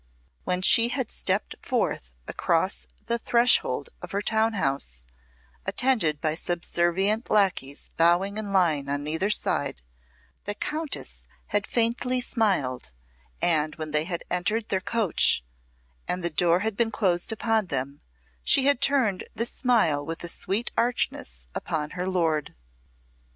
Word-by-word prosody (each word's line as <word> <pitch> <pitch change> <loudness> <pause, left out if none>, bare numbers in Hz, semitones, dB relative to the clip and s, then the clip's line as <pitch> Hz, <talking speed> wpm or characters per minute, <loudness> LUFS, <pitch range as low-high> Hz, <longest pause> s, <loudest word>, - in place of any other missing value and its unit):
When 180 0 -1
she 230 +4 +6
had 250 -2 -3
stepped - - 0
forth - - -2 0.2
across 65 +2 +1 0.2
the 235 - -1
threshold 240 - +3
of - - -9
her 200 - 0
town 220 +1 +2
house, 135 - -2 0.6
attended 195 - +2
by 155 +1 -1
subservient 175 +6 0
lacqueys 185 -9 +1
bowing 175 +5 +2
in 205 -2 -5
line 160 -7 +2
on 145 +1 -2
either 160 +6 0
side, - - 0 0.6
the 205 +1 -4
Countess 305 +5 -3 0.3
had 205 -1 -1
faintly 245 +2 0
smiled, 185 - 0 0.5
and 155 -2 +2
when 155 -1 -6
they 150 +1 +1
had 170 -1 -4
entered 210 +5 -1
their 190 - 0
coach 205 - +2 0.6
and 180 0 -2
the 170 - +1
door 170 +3 +2
been 225 +2 0
closed 185 -5 +1
upon 225 -2 0
them, 140 -1 -3 0.4
she 270 - +4
had 285 -2 +3
turned 260 -9 +2
this 230 +2 +1
smile 210 - +1
with 165 +3 -6
a - - -2
sweet 200 +6 -1
archness 60 - -1
upon 150 -1 -3
her 180 0 -4
lord. 160 -5 -1
185 Hz, 135 wpm, -25 LUFS, 155-225 Hz, 0.6 s, she